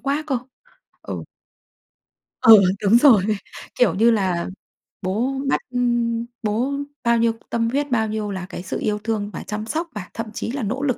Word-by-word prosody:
quá 285 +3 -1
cơ!" 265 -4 0 0.6
Ừ. - - -6 1.2
Ừ, 220 -3 +9 0.2
đúng 215 +4 +6
rồi. 245 -8 +6 0.6
Kiểu 230 -9 +4
như 230 +4 +4
là, 185 -6 0 0.5
bố 215 +8 0 0.2
bắt, - - +2
ưm 240 -2 0 0.2
bố 225 +6 0 0.3
bao 235 0 +3
nhiêu 230 0 +3 0.2
tâm 230 0 0
huyết, 285 +1 -1
bao 220 -2 +2
nhiêu 210 -1 -3
là 185 -2 -4
cái 180 - -7
sự - - -4
yêu 210 -1 -1
thương 215 -2 -2
và - - -6
chăm 215 +1 -4
sóc 325 +8 -2
và 185 -3 -6
thậm 225 - -4
chí 230 - -4
là 270 -3 -3
nỗ 255 +7 -2
lực 255 -4 +1
230 Hz, 180 wpm, -22 LUFS, 210-245 Hz, 1.2 s, Ừ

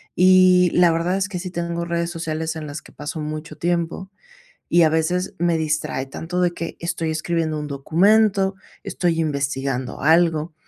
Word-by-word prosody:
Y 185 0 +6
la 175 -1 +5
verdad 170 +3 0
es 195 +1 -1
que 180 -3 -4
sí 185 0 -5
tengo 170 -1 -3
redes 170 0 -2
sociales 160 -1 -3
en 155 -2 -6
las 145 +2 -6
que - - -17
paso 150 +2 -6
mucho 155 +1 -6
tiempo, 175 +2 -2 0.6
y 170 0 +5
a 155 - +5
veces 160 +3 0
me 170 -1 +2
distrae 155 -4 -2
tanto 165 +6 -4
de 175 -1 +2
que 165 - -6
estoy 165 -1 -2
escribiendo 160 -1 -1
un 150 - -5
documento, 195 +7 +2 0.3
estoy 175 -4 -1
investigando 135 -4 -2
algo 160 +1 +3
165 Hz, 170 wpm, -21 LUFS, 155-180 Hz, 0.6 s, Y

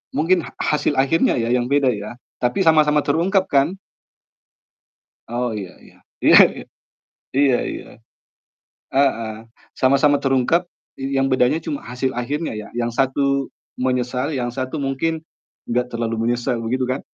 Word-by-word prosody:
Mungkin 170 +2 +2
ha - - -11
hasil 150 -1 0
akhirnya 140 +5 +2
ya, 115 +1 -1
yang 125 0 +1
beda 140 -2 +3
ya? 105 +1 -6 0.2
Tapi 125 +11 0
sama-sama 155 -2 +4
terungkap 185 +6 +1
kan? 145 +7 +2 1.5
Oh, 120 +1 -1
iya 95 -2 -7
iya - - -18 0.3
iya - - +7 0.2
iya, - - -9 0.7
iya 135 -3 +3
iya, - - -8 1.1
heeh, 130 -5 +2 0.5
sama-sama 140 +2 +4
terungkap, 135 +6 +2 0.5
yang 135 0 +2
bedanya 130 +4 +3
cuma 290 -2 -3
hasil 130 +1 -1
akhirnya 145 +5 -3
ya, 105 - -9
yang 120 0 -1
satu 140 0 +1 0.2
menyesal, 125 +2 -1
yang 120 -1 -2
satu 130 +3 -3
mungkin 160 +4 -2 0.4
enggak 125 +1 0
terlalu 115 -1 -2
menyesal, 120 0 -1
begitu 130 +3 -1
kan? 135 - -3
135 Hz, 135 wpm, -21 LUFS, 125-150 Hz, 1.5 s, iya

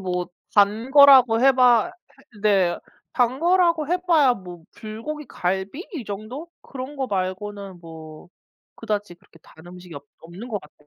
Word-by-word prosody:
뭐 180 -1 -3 0.3
단 210 +4 +2
거라고 265 -5 +7
해봐 255 +4 +4 0.5
네 190 -5 +2 0.3
단 250 +2 0
거라고 340 -3 +2
해봐야 340 -7 +3
뭐 180 -4 -11
불고기 230 +8 -7
갈비 190 - -4
이 270 - -5
정도 215 +11 -7
그런 275 +2 -8
거 265 -1 -2
말고는 195 -1 -5
뭐 160 0 -12 0.5
그다지 210 -4 -4
그렇게 170 -2 -23
단 160 +2 -18
음식이 180 -1 -12
없 140 - -10 0.2
없는 175 +9 -11
것 210 -4 -4
같아요. 150 0 -21
215 Hz, 265 characters per minute, -22 LUFS, 180-270 Hz, 0.5 s, 거라고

